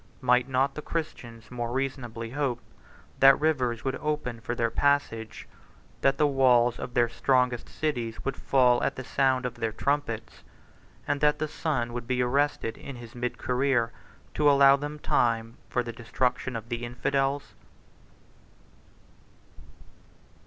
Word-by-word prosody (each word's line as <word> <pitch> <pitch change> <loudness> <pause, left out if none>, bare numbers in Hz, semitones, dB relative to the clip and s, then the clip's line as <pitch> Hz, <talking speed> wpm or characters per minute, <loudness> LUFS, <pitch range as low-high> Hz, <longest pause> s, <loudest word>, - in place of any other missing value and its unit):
Might 125 0 +3
not 135 +1 +1
the 150 - -6
Christians 120 -9 -6
more 120 -1 -3
reasonably 120 -3 -3
hope 135 -3 -1 0.6
that 135 0 +9
the - - -2
rivers 130 -7 0
would 135 - -1
open 150 -6 -3
for 120 0 -3
their 115 -1 0
passage; 115 -6 0 0.5
that 135 0 +3
the 150 - +4
walls 125 -4 +3
of 125 - -6
their 120 -1 +4
strongest 125 +1 +1
cities 120 -8 -3
would 135 - -1
fall 125 -2 +3
at - - 0
the 130 - -6
sound 130 0 +1
of 125 - -2
their 115 -2 -2
trumpets; 140 -2 -2 0.7
and 145 -1 0
that 150 0 +4
the 155 - -2
sun 135 -6 -2
would 120 -1 -5
be 125 -1 0
arrested 135 -3 0
in 140 - -8
his 120 -1 -11
mid 125 0 -3
career, 125 -2 +1 0.4
to 150 -1 +4
allow 140 -1 +7
them 145 +2 -5
time 115 -5 0
for 125 - 0
the 115 -1 -6
destruction 125 +2 -1
of 115 0 -6
the 120 -1 -3
infidels? 135 +3 -1
125 Hz, 150 wpm, -27 LUFS, 120-140 Hz, 0.7 s, that